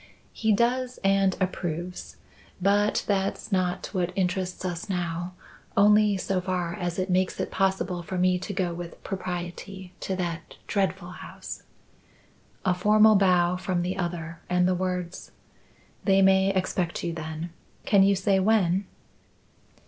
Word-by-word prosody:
"He 220 -1 +1
does 250 +4 +1
and 195 -1 +3
approves. 180 -1 -3 0.4
But 205 +3 +2
that's 195 +1 -1
not 185 -1 0
what 180 -2 0
interests 185 -1 -1
us 180 +3 -4
now, 175 -1 -2 0.4
only 210 0 +5
so 185 0 -1
far 180 -2 -2
as 175 -2 -3
it 185 0 0
makes 185 0 +1
it - - -2
possible 190 -2 0
for 185 +2 -5
me 180 0 +3
to 190 - -5
go 185 -3 -1
with 170 0 -8
propriety 185 0 -5
to 190 - -2
that 170 -3 -4
dreadful 190 -2 -1
house." - - -8 1.0
A 185 - +4
formal 210 +4 +5
bow 180 -2 +4
from 180 -1 -1
the 180 +1 -2
other 170 -2 -4
and 180 0 +3
the 185 - +3
words: 180 -1 -3 0.7
"They 195 -1 +4
may 190 0 +5
expect 185 -2 -1
you, 170 -1 -2
then. 160 +1 -5 0.3
Can 200 -2 +5
you 200 +1 +5
say 190 0 +2
when?" 190 -2 +2
185 Hz, 140 wpm, -26 LUFS, 175-195 Hz, 1.0 s, only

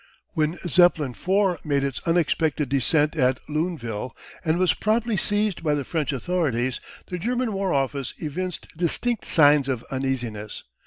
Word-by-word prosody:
When 160 0 0
Zeppelin 170 -5 +4
IV 185 - 0
made 140 -2 +1
its 135 -3 -2
unexpected 160 -4 +1
descent 145 +4 +2
at 130 -4 +2
Luneville, 135 - -3 0.3
and 160 -1 +1
was 185 -1 +3
promptly 220 +1 0
seized 205 -1 +1
by 150 -2 +1
the 145 - -2
French 155 -4 -1
authorities, 130 -4 -1 0.2
the 180 - -5
German 240 +3 -1
War 195 -1 -1
office 135 -2 -1
evinced 175 +4 -5
distinct 195 +8 -1
signs 145 -3 +5
of 125 -3 -2
uneasiness. 125 -6 -3
155 Hz, 145 wpm, -24 LUFS, 135-180 Hz, 0.3 s, signs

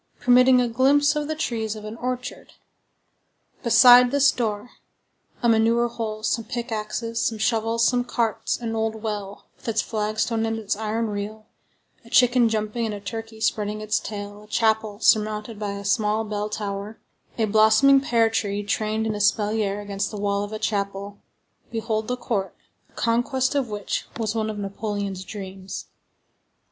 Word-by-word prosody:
permitting 250 +1 +5
a 245 - +2
glimpse 280 +5 +3
of 300 -1 -1
the 315 - -2
trees 225 -8 -2
of 215 -1 -9
an 215 +1 -6
orchard; 250 0 -5 1.1
beside 245 +1 +7
this 285 +1 +4
door, 220 -1 -3 0.7
a - - +4
manure 230 +1 +3
hole, 220 -2 -5
some 230 +1 0
pickaxes, 230 0 -3
some 225 - 0
shovels, 225 +1 +1
some 245 +1 +2
carts, 235 -3 -1
an 230 -2 -3
old 220 0 -2
well, 205 -2 -5
with - - -16
its 225 -1 0
flagstone 220 +1 -1
and 225 0 -2
its 210 -2 -2
iron 220 +2 -2
reel, 210 +1 -5 0.6
a 230 - -16
chicken 245 -1 +4
jumping, 220 +1 -1
and 210 - -3
a - - -7
turkey 225 +2 -7
spreading 210 -1 -1
its 215 0 0
tail, 205 -1 -7
a - - -21
chapel 220 -1 +1
surmounted 215 0 +1
by 205 -1 -3
a 200 0 -7
small 210 +2 +1
bell 210 -1 -3
tower, 205 0 -5 0.4
a 225 - +2
blossoming 220 +6 +5
pear 230 -4 +3
tree 205 -2 -1
trained 215 +2 -1
in 220 - -1
espalier 210 0 +1
against 200 0 -3
the 210 - -7
wall 200 0 0
of 205 - -5
the 215 - -5
chapel—behold 205 +2 -4
the 250 - -2
court, 210 -5 -3 0.3
the - - -32
conquest 245 +3 0
of 275 -5 0
which 205 -1 -3
was 220 -2 -1
one 220 -1 -1
of 215 - -5
Napoleon's 200 -1 -4
dreams. 190 -1 -7
220 Hz, 160 wpm, -24 LUFS, 210-230 Hz, 1.1 s, beside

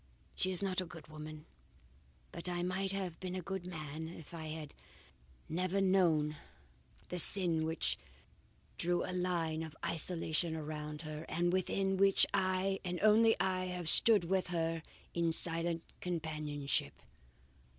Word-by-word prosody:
"She 185 - -2
is 185 +1 +2
not 185 -1 -1
a - - -5
good 165 -2 -13
woman, 155 0 -10 0.9
but 170 +1 -4
I 175 0 -3
might 190 +2 -2
have 190 -4 -5
been 185 -1 -6
a 185 - -4
good 190 0 -6
man 155 -2 -7
if 165 -1 -12
I 160 -2 -7
had 155 -2 -8 0.7
never 185 +3 -2
known 170 -6 +2 0.7
the 180 - -4
sin 170 -3 +6
which 160 0 -3 0.8
drew 175 +1 0
a 185 - -5
line 170 -3 -2
of 160 -1 -8
isolation 165 0 -2
about 150 0 -6
her, 155 0 -7
and 175 +1 0
within 190 +1 -1
which 195 0 +4
I, 190 +1 0
and 180 -2 -4
only 220 +1 +4
I, 185 0 -1
have 180 -2 -3
stood 215 -5 +6
with 185 +1 -1
her 165 -2 -2 0.3
in 170 -1 0
silent 165 0 +8 0.2
companionship. 155 -5 -3
175 Hz, 145 wpm, -33 LUFS, 160-185 Hz, 0.9 s, silent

